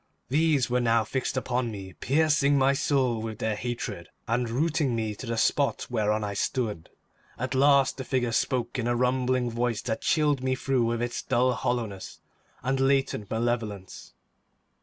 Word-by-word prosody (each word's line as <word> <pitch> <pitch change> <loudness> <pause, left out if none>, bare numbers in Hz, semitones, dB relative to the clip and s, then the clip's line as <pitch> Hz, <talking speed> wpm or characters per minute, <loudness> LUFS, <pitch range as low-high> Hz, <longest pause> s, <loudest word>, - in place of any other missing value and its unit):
These 150 -2 +2
were 125 0 +1
now 115 -2 +3
fixed 130 +3 -2
upon 125 -1 -1
me, 95 -3 -8
piercing 145 - +2
my 135 0 +4
soul 135 -5 +1
with 110 -1 -5
their 110 -1 -1
hatred, 105 -6 -5 0.2
and 120 +1 0
rooting 145 0 0
me 110 -2 -2
to 110 +4 -9
the 115 0 -2
spot 140 +4 +1
whereon 105 -2 +1
I 100 -1 -3
stood. 105 -4 -2 0.5
At 130 +1 -3
last 135 0 +4
the 130 - -4
figure 125 -3 0
spoke 120 +1 -1
in 120 - -1
a 120 - +1
rumbling 125 0 +1
voice 120 -1 -1
that 110 -2 -2
chilled 150 -4 +2
me 130 0 0
through 130 -2 0
with 115 +1 -1
its 120 0 -3
dull 125 +1 +2
hollowness 115 -7 -3 0.4
and 135 +1 0
latent 135 -6 +1
malevolence. 110 -4 -3
125 Hz, 165 wpm, -27 LUFS, 115-135 Hz, 0.5 s, my